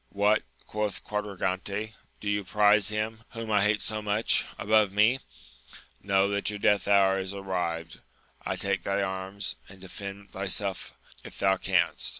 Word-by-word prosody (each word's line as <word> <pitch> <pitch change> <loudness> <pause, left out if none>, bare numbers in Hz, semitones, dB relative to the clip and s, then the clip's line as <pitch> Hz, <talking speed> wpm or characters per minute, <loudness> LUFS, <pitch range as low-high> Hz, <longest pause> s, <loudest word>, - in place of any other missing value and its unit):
What! 105 +2 +3 0.2
quoth 105 -1 -2
Quadragante, 100 +1 -3 0.3
do 105 - -7
you 105 0 +1
prize 105 +1 +4
him, 110 +1 -2
whom 115 -2 -5
I 105 -1 +4
hate 105 +1 +2
so 110 -1 -4
much, 105 +1 +1
above 105 -1 +3
me 110 +6 +4 0.8
1 - - -23
Know, 100 0 +4
that 100 0 0
your 105 - -3
death 105 0 +2
hour 95 -1 +5
is 95 +1 -4
arrived! 90 -4 -3 0.5
take - - 0
thy 100 0 0
arms, 95 +1 -4
and 95 - -14
defend 100 +1 -8
thyself 100 0 -3 0.3
if - - -11
thou 95 0 +3
canst. 90 -2 +1
100 Hz, 150 wpm, -28 LUFS, 95-105 Hz, 0.8 s, hour